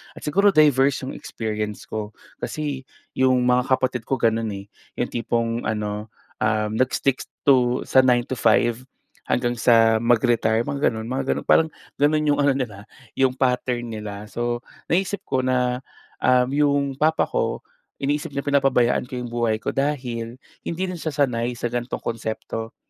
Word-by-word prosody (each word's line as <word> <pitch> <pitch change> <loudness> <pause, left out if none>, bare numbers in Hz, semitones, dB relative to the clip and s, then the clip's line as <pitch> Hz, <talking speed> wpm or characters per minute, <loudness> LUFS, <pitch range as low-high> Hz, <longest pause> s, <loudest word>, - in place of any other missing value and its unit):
at - - -12
siguro 200 +7 +3
diverse 140 -3 +4
yung - - -4
experience 105 -2 -5
ko, 110 -1 -4 0.3
kasi, 145 -3 -4 0.3
yung 130 -1 +3
mga 125 0 +4
kapatid 130 -3 0
ko 135 - 0
ganun, 115 -1 +1
eh. 100 +1 -8 0.3
Yung - - +1
tipong 115 0 -1
ano, 105 0 -3 0.3
um, 105 0 +1
nag-stick 130 +1 +1 0.2
to 125 -2 +4
sa 130 - +5
9 120 -1 +4
to 130 - -3
5 120 +2 +2 0.4
hanggang 120 0 0
sa 115 -1 +5
mag-retire 115 -1 +3
mga 140 -3 +1
ganun 110 0 -6
mga 130 +2 -2
ganun - - -2
parang 160 0 +5 0.3
ganun 150 +1 +2
yung 145 0 +2
ano 140 - +4
nila 120 -7 -3 0.3
yung 130 -1 +3
pattern 125 -2 0
nila. 105 -1 -6
So, 120 +3 -2 0.3
naisip 195 +3 0
ko 130 - -1
na, 125 -1 +1 0.4
um, 125 -1 +4
'yong 145 0 +2
papa 160 +1 +3
ko - - -2 0.4
iniisip 145 +1 -1
niya 140 - -2
pinapabayaan 135 -4 +2
ko 130 - -7
yung 125 -1 -5
buhay 115 -2 +1
ko - - -1
dahil 125 -5 -2 0.3
hindi 170 +3 -2
rin 175 - -6
siya 155 -3 -4
sanay 125 -4 0
sa 120 0 -3
gan'tong 120 0 -3
konsepto, 115 0 -4
125 Hz, 160 wpm, -23 LUFS, 115-135 Hz, 0.4 s, sa